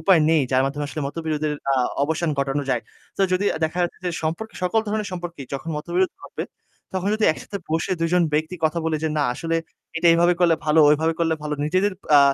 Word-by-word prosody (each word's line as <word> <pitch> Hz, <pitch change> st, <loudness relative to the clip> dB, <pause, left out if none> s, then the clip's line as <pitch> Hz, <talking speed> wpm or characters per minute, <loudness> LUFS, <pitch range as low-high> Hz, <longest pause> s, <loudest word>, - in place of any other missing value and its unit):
উপায় 185 Hz, -5 st, +5 dB
নেই। 160 Hz, -3 st, +4 dB
যার 130 Hz, +1 st, +4 dB
মাধ্যমে 145 Hz, +2 st, -3 dB
আসলে 155 Hz, -, -5 dB
মতবিরোধের 155 Hz, -1 st, -2 dB, 0.2 s
আ -, -, +3 dB, 0.3 s
অবসান 160 Hz, +2 st, 0 dB
ঘটানো 140 Hz, +1 st, 0 dB
যায়। 120 Hz, -2 st, 0 dB, 0.3 s
তো -, -, -4 dB
যদি 185 Hz, +2 st, +1 dB
আ -, -, -4 dB
দেখা 160 Hz, +3 st, -3 dB
যাচ্ছে 175 Hz, -, -2 dB
যে -, -, +1 dB
সম্পর্ক 165 Hz, +8 st, -2 dB
সকল 180 Hz, +5 st, +2 dB
ধরনের 210 Hz, -1 st, -2 dB
সম্পর্কই 175 Hz, -6 st, -6 dB
যখন 140 Hz, +4 st, -5 dB
মতবিরোধ 175 Hz, +4 st, 0 dB
হবে। -, -, -5 dB, 0.5 s
তখন 190 Hz, +1 st, -1 dB
যদি 215 Hz, 0 st, 0 dB
একসাথে 200 Hz, +5 st, -7 dB
বসে 165 Hz, +4 st, 0 dB
২ 165 Hz, -, +2 dB
জন 180 Hz, -, +5 dB
ব্যক্তি 155 Hz, +4 st, 0 dB
কথা 160 Hz, +2 st, +1 dB
বলে 160 Hz, -1 st, +1 dB
যে -, -, +2 dB
না 145 Hz, -, +2 dB
আসলে 165 Hz, +2 st, -1 dB, 0.4 s
এটা 170 Hz, -, +4 dB
এভাবে 175 Hz, +1 st, +4 dB
করলে 170 Hz, -2 st, +5 dB
ভালো, 155 Hz, +1 st, +4 dB
ওইভাবে 160 Hz, +2 st, +2 dB
করলে 165 Hz, -1 st, +2 dB
ভালো। 150 Hz, 0 st, -2 dB
নিজেদের 185 Hz, +6 st, +1 dB, 0.3 s
আ -, -, +8 dB
165 Hz, 215 wpm, -23 LUFS, 150-180 Hz, 0.5 s, আ